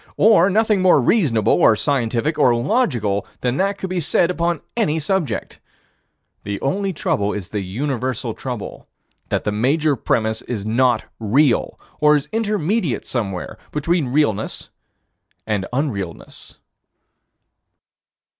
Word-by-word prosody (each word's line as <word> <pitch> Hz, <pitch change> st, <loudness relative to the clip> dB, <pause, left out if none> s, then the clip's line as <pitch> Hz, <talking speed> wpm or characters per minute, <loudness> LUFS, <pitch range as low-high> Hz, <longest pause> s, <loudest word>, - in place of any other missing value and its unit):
Or 200 Hz, -3 st, +5 dB
nothing 215 Hz, 0 st, +2 dB
more 185 Hz, -5 st, +5 dB
reasonable 125 Hz, -, +2 dB
or 110 Hz, -, +5 dB
scientific 140 Hz, +4 st, 0 dB
or 125 Hz, -4 st, +5 dB
logical 120 Hz, -, 0 dB, 0.2 s
than 125 Hz, +1 st, 0 dB
that 200 Hz, +1 st, 0 dB
could 190 Hz, -2 st, -5 dB
be 185 Hz, -, 0 dB
said 170 Hz, +2 st, +2 dB
upon 170 Hz, -2 st, -1 dB
any 200 Hz, -10 st, +1 dB
subject. 165 Hz, +1 st, -2 dB, 0.8 s
The 100 Hz, 0 st, -4 dB
only 195 Hz, +8 st, -1 dB
trouble 105 Hz, -, -1 dB
is 100 Hz, -4 st, -6 dB
the 105 Hz, -, -3 dB
universal 125 Hz, +3 st, -3 dB
trouble: 125 Hz, -4 st, -7 dB, 0.4 s
that -, -, -1 dB
the 105 Hz, -, -1 dB
major 140 Hz, +8 st, +1 dB
premise 110 Hz, -1 st, -1 dB
is 110 Hz, -6 st, -5 dB
not 120 Hz, +1 st, +2 dB, 0.2 s
real, 120 Hz, +4 st, +2 dB, 0.2 s
or 150 Hz, 0 st, +5 dB
is 145 Hz, -, -1 dB
intermediate 210 Hz, -, -1 dB
somewhere 100 Hz, -7 st, -4 dB
between 155 Hz, 0 st, 0 dB
realness 125 Hz, -6 st, -1 dB, 0.7 s
and 105 Hz, -3 st, -1 dB
unrealness. 110 Hz, -, -4 dB
135 Hz, 125 wpm, -20 LUFS, 110-170 Hz, 0.8 s, Or